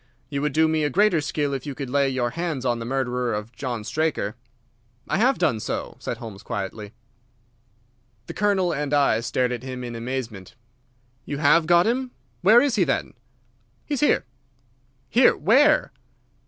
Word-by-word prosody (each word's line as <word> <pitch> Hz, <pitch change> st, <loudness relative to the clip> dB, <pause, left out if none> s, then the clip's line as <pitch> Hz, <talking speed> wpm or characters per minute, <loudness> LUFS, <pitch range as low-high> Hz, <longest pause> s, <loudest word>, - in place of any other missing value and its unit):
You 140 Hz, -1 st, -2 dB
would 150 Hz, 0 st, 0 dB
do 160 Hz, +1 st, +4 dB
me 155 Hz, -1 st, 0 dB
a 145 Hz, -, +1 dB
greater 190 Hz, +1 st, +3 dB
still 145 Hz, -1 st, -2 dB
if 135 Hz, +1 st, -5 dB
you 140 Hz, -, -5 dB
could 135 Hz, -1 st, -5 dB
lay 140 Hz, 0 st, +2 dB
your 125 Hz, -2 st, -1 dB
hands 160 Hz, -5 st, -3 dB
on 120 Hz, -2 st, 0 dB
the 115 Hz, -, -5 dB
murderer 125 Hz, -2 st, -1 dB
of 105 Hz, +2 st, -6 dB
John 120 Hz, -5 st, -4 dB
Straker." 130 Hz, -4 st, -1 dB, 0.7 s
"I -, -, 0 dB
have 260 Hz, +4 st, +3 dB
done 150 Hz, -11 st, +1 dB
so," -, -, -4 dB
said -, -, -4 dB
Holmes 110 Hz, -4 st, -9 dB
quietly. 105 Hz, -1 st, -5 dB, 1.3 s
The -, -, -7 dB
Colonel 190 Hz, -4 st, +1 dB
and 145 Hz, 0 st, -1 dB
I 140 Hz, -6 st, +3 dB
stared 125 Hz, +2 st, -1 dB
at 120 Hz, -2 st, -4 dB
him 130 Hz, -1 st, -6 dB
in 120 Hz, -1 st, -6 dB
amazement. 115 Hz, -4 st, -5 dB, 0.7 s
"You 145 Hz, -, -5 dB
have 150 Hz, +2 st, +4 dB
got 175 Hz, +1 st, +5 dB
him! 250 Hz, +3 st, 0 dB, 0.3 s
Where 220 Hz, +5 st, +7 dB
is 275 Hz, -5 st, +1 dB
he, 190 Hz, -, +4 dB
then?" 135 Hz, -5 st, -1 dB, 0.7 s
"He 300 Hz, -, -4 dB
is 280 Hz, -, -1 dB
here." 295 Hz, -, +2 dB, 0.8 s
"Here! 245 Hz, -, +4 dB
Where?" 280 Hz, -, +4 dB
140 Hz, 175 wpm, -24 LUFS, 120-175 Hz, 1.3 s, Where